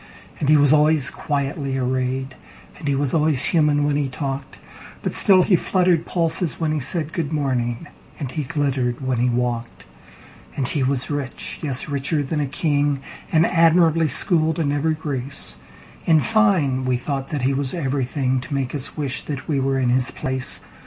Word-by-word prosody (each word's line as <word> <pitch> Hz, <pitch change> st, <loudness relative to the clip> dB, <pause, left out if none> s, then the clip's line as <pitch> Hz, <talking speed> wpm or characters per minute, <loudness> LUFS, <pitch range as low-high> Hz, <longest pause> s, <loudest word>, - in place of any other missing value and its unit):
And 145 Hz, -, 0 dB
he 155 Hz, -, +7 dB
was 145 Hz, 0 st, +5 dB
always 150 Hz, -2 st, +3 dB
quietly 140 Hz, -1 st, -2 dB
arrayed, 130 Hz, +1 st, -1 dB, 0.5 s
And 150 Hz, -, -6 dB
he 140 Hz, -, +2 dB
was 140 Hz, -1 st, 0 dB
always 150 Hz, -4 st, +3 dB
human 150 Hz, -3 st, +3 dB
when 145 Hz, 0 st, +1 dB
he 145 Hz, -2 st, -1 dB
talked; 135 Hz, +1 st, -5 dB, 0.5 s
But -, -, -1 dB
still 185 Hz, -2 st, +5 dB
he 190 Hz, -, +4 dB
fluttered 180 Hz, -1 st, +1 dB
pulses 165 Hz, -1 st, -1 dB
when 160 Hz, -2 st, 0 dB
he 155 Hz, -, 0 dB
said,"Good 155 Hz, +2 st, -2 dB
morning," 130 Hz, -3 st, -1 dB, 0.3 s
and 135 Hz, -4 st, -5 dB
he 155 Hz, -, -2 dB
glittered 135 Hz, -4 st, -1 dB
when 130 Hz, -2 st, 0 dB
he 125 Hz, +1 st, +2 dB
walked. 120 Hz, -1 st, -2 dB, 0.7 s
And 135 Hz, -3 st, -1 dB
he 145 Hz, -, -1 dB
was 130 Hz, +1 st, 0 dB
rich—yes, 140 Hz, 0 st, -3 dB
richer 145 Hz, +1 st, -1 dB
than 150 Hz, +3 st, -2 dB
a 145 Hz, -, 0 dB
king—And 145 Hz, +2 st, 0 dB
admirably 165 Hz, -1 st, +4 dB
schooled 160 Hz, +2 st, +1 dB
in 150 Hz, -4 st, 0 dB
every 155 Hz, +2 st, 0 dB
grace:In 140 Hz, -, -3 dB
fine, 180 Hz, -10 st, +2 dB
we 130 Hz, -1 st, +1 dB
thought 135 Hz, +1 st, -3 dB
that 145 Hz, -4 st, -3 dB
he 135 Hz, +2 st, +2 dB
was 135 Hz, -1 st, -2 dB
everythingTo 130 Hz, -3 st, -1 dB
make 135 Hz, -3 st, -2 dB
us 140 Hz, 0 st, -2 dB
wish 140 Hz, -3 st, -2 dB
that 140 Hz, -2 st, -5 dB
we 145 Hz, -3 st, 0 dB
were 135 Hz, 0 st, 0 dB
in 130 Hz, -2 st, +1 dB
his 125 Hz, +1 st, +2 dB
place. 130 Hz, -1 st, 0 dB
140 Hz, 165 wpm, -22 LUFS, 130-155 Hz, 0.7 s, he